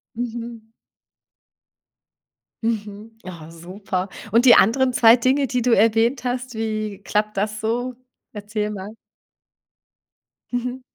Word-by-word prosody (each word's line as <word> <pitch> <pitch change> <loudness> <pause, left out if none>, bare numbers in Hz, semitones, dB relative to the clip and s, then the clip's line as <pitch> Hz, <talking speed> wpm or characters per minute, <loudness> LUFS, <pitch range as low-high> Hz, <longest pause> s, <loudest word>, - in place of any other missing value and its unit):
Mhm. 230 -1 -6 1.9
Mhm, 215 -1 -4
oh, 170 -4 -10
super. 185 +3 -5 0.2
Und 235 +4 +4
die 245 - +9
anderen 260 +3 +4
2 230 -1 +7
Dinge, 260 +3 +1
die 250 -1 -1
du 245 0 +1
erwähnt 225 +5 +2
hast, 250 -1 -4
wie 215 -2 -3
klappt 210 -1 -1
das 215 +2 -2
so? 245 +3 -2 0.4
Erzähl 210 0 -4
mal. 200 -1 -7 1.6
Mhm. 250 +1 -3
225 Hz, 110 wpm, -22 LUFS, 210-245 Hz, 1.9 s, die